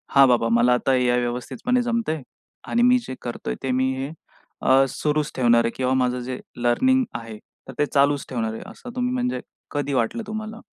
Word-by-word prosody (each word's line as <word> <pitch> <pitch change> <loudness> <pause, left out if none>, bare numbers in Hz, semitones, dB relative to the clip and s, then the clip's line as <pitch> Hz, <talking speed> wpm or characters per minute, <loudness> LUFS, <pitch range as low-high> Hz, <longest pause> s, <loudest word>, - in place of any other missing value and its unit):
"हां, 135 -1 +8
बाबा 120 -2 +3
मला 120 +1 +4
आता 130 +2 +1
या 125 -1 +2
व्यवस्थितपणे 125 - -1
जमतंय 230 - -1 0.5
आणि 235 - +1
मी 250 +1 +6
जे 130 - -5
करतोय 120 - -4
ते 130 - 0
मी 130 +1 +1
हे 135 +3 -4 0.5
अ, 135 +1 +5
सुरूच 150 +2 -1
ठेवणार 120 -2 +4
आहे 115 - 0
किंवा 130 0 0
माझं 125 -1 +1
जे 130 0 -5 0.2
लर्निंग 260 - +3 0.2
आहे 115 -2 -9 0.3
तर 135 - -8
ते 150 - +4
चालूच 140 0 +3
ठेवणार 115 -3 -2
आहे." 110 - -7
असं 250 - -11
तुम्ही 250 0 0
म्हणजे 250 -1 -1 0.3
कधी 145 -1 -2
वाटलं 130 - 0
तुम्हाला? 215 +1 -5
135 Hz, 190 wpm, -23 LUFS, -, 0.5 s, हां